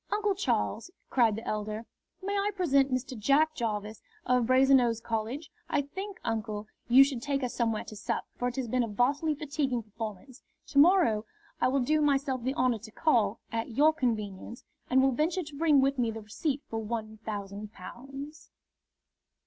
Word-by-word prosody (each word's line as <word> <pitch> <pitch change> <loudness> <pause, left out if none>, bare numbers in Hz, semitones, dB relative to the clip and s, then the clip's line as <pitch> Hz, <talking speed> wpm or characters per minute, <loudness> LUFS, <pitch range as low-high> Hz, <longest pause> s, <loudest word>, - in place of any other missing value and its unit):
"Uncle 420 -1 +1
Charles!" 390 -2 -1 0.2
cried 230 -5 +4
the 225 - -7
elder, 215 +1 -3 0.4
"may 400 +1 -2
I 400 +1 +1
present 280 -7 +3
Mr. 255 0 -2
Jack 280 +8 +3
Jarvis, 215 -4 -3 0.2
of 250 -2 +2
Brasenose 255 -3 +4
College? 230 +7 -4 0.2
I 285 - +1
think, 385 +7 -7
uncle, 215 -2 -3 0.2
you 255 +3 +8
should 270 -4 -2
take 280 0 -1
us 250 - -2
somewhere 225 -3 0
to 215 - -10
sup, 205 - -3
for 245 - -1
it 245 - -3
has 260 -3 -2
been 250 +3 +1
a 235 - 0
vastly 275 +8 +1
fatiguing 280 -5 -2
performance. 220 +3 -8 0.3
To 280 - +3
morrow 290 - +5 0.3
I - - +3
will 270 +1 +2
do 305 +5 +2
myself 275 -3 +1
the 260 +3 -2
honour 245 -2 +2
to 220 +1 -11
call, 225 -7 +1
at 230 +1 -3
your 310 +2 +6
convenience, 225 -5 -3 0.3
and 265 +1 +4
will 270 - +4
venture 320 +8 0
to 300 -2 -11
bring 295 -2 +4
with 275 0 +1
me 235 -2 +2
the 225 0 -5
receipt 270 +7 -2
for 225 - -3
one 220 0 -4
thousand 205 -1 -5
pounds." 275 +9 -10
250 Hz, 180 wpm, -29 LUFS, 225-285 Hz, 0.4 s, you